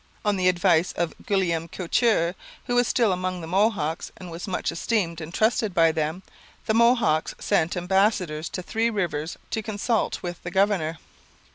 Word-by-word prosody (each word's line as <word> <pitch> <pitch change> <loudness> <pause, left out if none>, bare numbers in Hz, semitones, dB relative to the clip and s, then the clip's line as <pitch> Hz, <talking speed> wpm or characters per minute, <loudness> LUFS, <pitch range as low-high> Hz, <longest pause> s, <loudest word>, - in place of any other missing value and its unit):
On 205 -1 +2
the 185 -1 +1
advice 175 -2 +2
of 170 -1 -2
Guillaume 175 -6 +1
Couture, 180 0 +1 0.3
who 245 - -2
was 245 0 +3
still 230 -5 +2
among 185 0 -2
the 165 - -6
Mohawks 180 -3 0
and 180 -2 -9
was 170 +4 -6
much 185 - -1
esteemed 170 -2 -1
and 160 +1 -7
trusted 215 0 +1
by 165 -2 +5
them, 160 +3 -2 0.4
the 220 - +1
Mohawks 230 -9 +3
sent 165 +3 0
ambassadors 180 -4 +1
to 185 - -5
Three 225 +5 0
Rivers 175 -7 -2
to 220 - -1
consult 215 +2 -1
with 175 -1 -5
the 175 - -5
governor. 185 -4 +1
180 Hz, 165 wpm, -25 LUFS, 165-210 Hz, 0.4 s, by